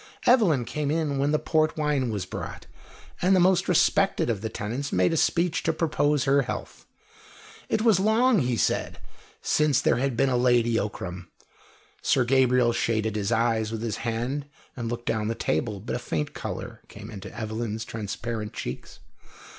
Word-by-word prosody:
Evelyn 185 Hz, -, +4 dB
came 150 Hz, +2 st, -3 dB
in 150 Hz, -3 st, 0 dB
when 140 Hz, +2 st, +1 dB
the 155 Hz, -, +3 dB
port 155 Hz, 0 st, +1 dB
wine 150 Hz, -5 st, 0 dB
was 100 Hz, -4 st, -3 dB
brought, -, -, -7 dB, 0.6 s
and 185 Hz, +2 st, +4 dB
the -, -, +4 dB
most 185 Hz, +1 st, +3 dB
respected 180 Hz, -4 st, +3 dB
of 105 Hz, -4 st, -3 dB
the 110 Hz, -, -3 dB
tenants 120 Hz, +8 st, -4 dB
made 90 Hz, -, +2 dB
a -, -, +1 dB
speech 170 Hz, +1 st, +1 dB
to -, -, +1 dB
propose 150 Hz, -3 st, +1 dB
her 140 Hz, 0 st, +3 dB
health. 125 Hz, -, -6 dB, 0.8 s
It 220 Hz, -, +1 dB
was 220 Hz, -6 st, +4 dB
long, 220 Hz, +3 st, +3 dB
he 125 Hz, -4 st, 0 dB
said, -, -, 0 dB, 0.5 s
since 150 Hz, -3 st, +2 dB
there -, -, +2 dB
had 130 Hz, -1 st, -1 dB
been 135 Hz, -, +3 dB
a 130 Hz, -, +1 dB
Lady 120 Hz, -2 st, +3 dB
Ockram. 90 Hz, -3 st, -5 dB, 0.7 s
Sir 130 Hz, -, +2 dB
Gabriel 125 Hz, -2 st, +3 dB
shaded 110 Hz, -2 st, 0 dB
his 105 Hz, 0 st, -1 dB
eyes 115 Hz, -1 st, +1 dB
with 115 Hz, 0 st, -4 dB
his 110 Hz, -3 st, -2 dB
hand 120 Hz, +5 st, -3 dB, 0.3 s
and 120 Hz, -2 st, -4 dB
looked 120 Hz, 0 st, -5 dB
down 110 Hz, -, 0 dB
at 115 Hz, -, -3 dB
the -, -, -6 dB
table, 100 Hz, +7 st, 0 dB
but 105 Hz, -, -4 dB
a -, -, -2 dB
faint 80 Hz, -10 st, -3 dB
colour -, -, -6 dB
came -, -, -10 dB
into 100 Hz, -3 st, -8 dB
Evelyn's 110 Hz, 0 st, -3 dB
transparent 110 Hz, 0 st, -5 dB
cheeks. -, -, -7 dB
120 Hz, 180 wpm, -26 LUFS, 110-150 Hz, 0.8 s, Evelyn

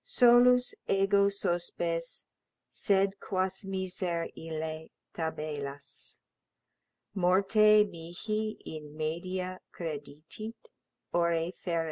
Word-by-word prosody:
Solus 245 Hz, +1 st, +5 dB
ego 200 Hz, +1 st, +4 dB
sospes, 170 Hz, -3 st, -2 dB, 0.5 s
sed 195 Hz, -1 st, +1 dB
quas 185 Hz, +1 st, -1 dB
miser 185 Hz, -3 st, -2 dB
ille 160 Hz, 0 st, -5 dB, 0.2 s
tabellas 150 Hz, -3 st, -4 dB, 1.0 s
Morte 200 Hz, +3 st, +5 dB
mihi 215 Hz, +6 st, -4 dB
in 150 Hz, -1 st, -8 dB
media 185 Hz, +4 st, -3 dB
credidit, 165 Hz, -, -7 dB, 0.4 s
ore 170 Hz, 0 st, +2 dB
ferens. 170 Hz, -2 st, -2 dB
180 Hz, 75 wpm, -30 LUFS, 165-200 Hz, 1.0 s, Solus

